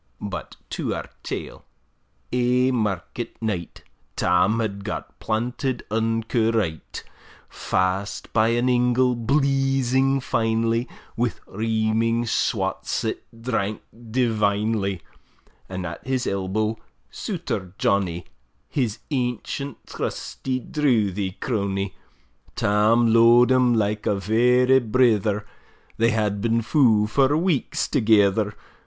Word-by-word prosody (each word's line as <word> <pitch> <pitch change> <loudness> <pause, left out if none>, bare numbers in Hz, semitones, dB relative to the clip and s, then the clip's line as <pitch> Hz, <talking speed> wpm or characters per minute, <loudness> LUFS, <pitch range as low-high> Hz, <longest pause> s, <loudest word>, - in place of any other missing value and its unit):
But 95 -4 -6 0.2
to - - -2
our - - -7
tale: - - -6 0.7
Ae 125 +1 +2
market 110 0 -3
night, 105 -7 -4 0.3
Tam 90 +5 +2
had 100 -3 -3
got 105 - -6
planted 120 +3 -2
unco 115 +1 +1
right; 85 -9 -2 0.4
Fast 95 +2 -2
by 110 -1 +4
an 120 +2 +1
ingle, 125 0 +3
bleezing 135 +1 +2
finely, 115 0 0 0.3
Wi' 120 0 0
reaming 115 +2 0
swats, 115 - -1
that - - -3 0.2
drank 110 -4 -2 0.3
divinely; 105 - 0 0.7
And 95 -1 -4
at 85 0 -7
his 130 -1 0
elbow, 105 +3 -1 0.3
Souter 125 - -4
Johnny, 90 -4 0 0.4
His 120 -6 -1
ancient, 130 +1 -3
trusty, 130 -1 -4
drouthy 105 - 0
crony; 100 -4 -2 0.6
Tam 110 +3 +3
lo'ed 120 +2 +6
him 125 -2 +4
like 105 -1 0
a 105 - +2
vera 125 +6 +3
brither; 110 -3 +2 0.5
They 115 +1 +3
had 105 -2 0
been 115 +1 +1
fou 115 -6 +4
for 135 +7 +2
weeks 165 -5 0
thegither. 105 -2 +3
115 Hz, 105 wpm, -23 LUFS, 105-125 Hz, 0.7 s, lo'ed